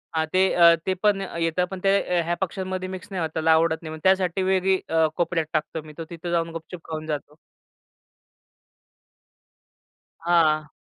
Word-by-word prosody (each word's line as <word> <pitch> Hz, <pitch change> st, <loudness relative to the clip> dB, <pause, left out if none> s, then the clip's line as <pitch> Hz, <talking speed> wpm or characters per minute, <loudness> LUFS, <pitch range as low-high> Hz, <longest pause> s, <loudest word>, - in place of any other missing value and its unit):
हां 160 Hz, 0 st, +1 dB
ते, 185 Hz, -, +4 dB
अ, 170 Hz, -1 st, +7 dB
ते 190 Hz, -, +1 dB
पण 205 Hz, -2 st, +3 dB, 0.2 s
येतात. 165 Hz, +2 st, +1 dB
पण 190 Hz, -, -5 dB
ते 195 Hz, 0 st, +4 dB, 0.2 s
अ, -, -, +3 dB
ह्या 170 Hz, +1 st, -1 dB
पक्ष्यांमध्ये 185 Hz, 0 st, -3 dB
मिक्स 185 Hz, -1 st, -7 dB
नाही 185 Hz, -3 st, -3 dB
होत, 160 Hz, -, -1 dB
त्याला 160 Hz, 0 st, +2 dB
आवडत 160 Hz, 0 st, +3 dB
नाही. 155 Hz, -2 st, -7 dB
मग 160 Hz, -, -10 dB
त्यासाठी 190 Hz, -1 st, +2 dB
वेगळी 190 Hz, 0 st, +2 dB
अ, 160 Hz, 0 st, +3 dB
कोपऱ्यात 170 Hz, -2 st, 0 dB
टाकतो 155 Hz, +1 st, -2 dB
मी 155 Hz, -, -11 dB
तो 165 Hz, -, -5 dB
तिथे 170 Hz, 0 st, -6 dB
जाऊन 165 Hz, -1 st, 0 dB
गुपचुप 165 Hz, +1 st, -10 dB
खाऊन 155 Hz, -1 st, -4 dB
जातो. 150 Hz, -1 st, -5 dB, 2.9 s
हां. 155 Hz, -3 st, +2 dB
170 Hz, 170 wpm, -24 LUFS, 160-185 Hz, 2.9 s, अ